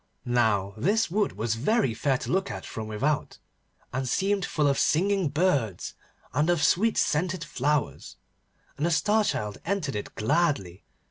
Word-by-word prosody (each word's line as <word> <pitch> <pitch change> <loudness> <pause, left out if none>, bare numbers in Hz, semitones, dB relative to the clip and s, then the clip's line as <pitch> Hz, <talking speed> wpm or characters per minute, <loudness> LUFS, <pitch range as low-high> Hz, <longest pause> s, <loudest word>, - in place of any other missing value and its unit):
Now 110 -5 +1
this 200 - +1
wood 205 +1 +1
was 115 0 -1
very 140 - +1
fair 135 +3 +1
to - - -5
look 190 +2 +1
at - - -6
from 110 -1 -6
without, 135 +8 -1 0.6
and 130 0 -2
seemed 195 +5 +1
full 150 - 0
of 140 - +2
singing 190 +1 +2
birds 140 - 0 0.4
and 150 +5 +1
of 175 -4 +2
sweet 215 +9 +3
scented 170 +2 0
flowers, 145 +1 -2 0.6
and 150 - 0
the - - +1
Star 210 +6 +2
Child 105 - -2
entered 175 - -2
it 105 - -5
gladly. 120 - 0
150 Hz, 155 wpm, -27 LUFS, 115-185 Hz, 0.6 s, sweet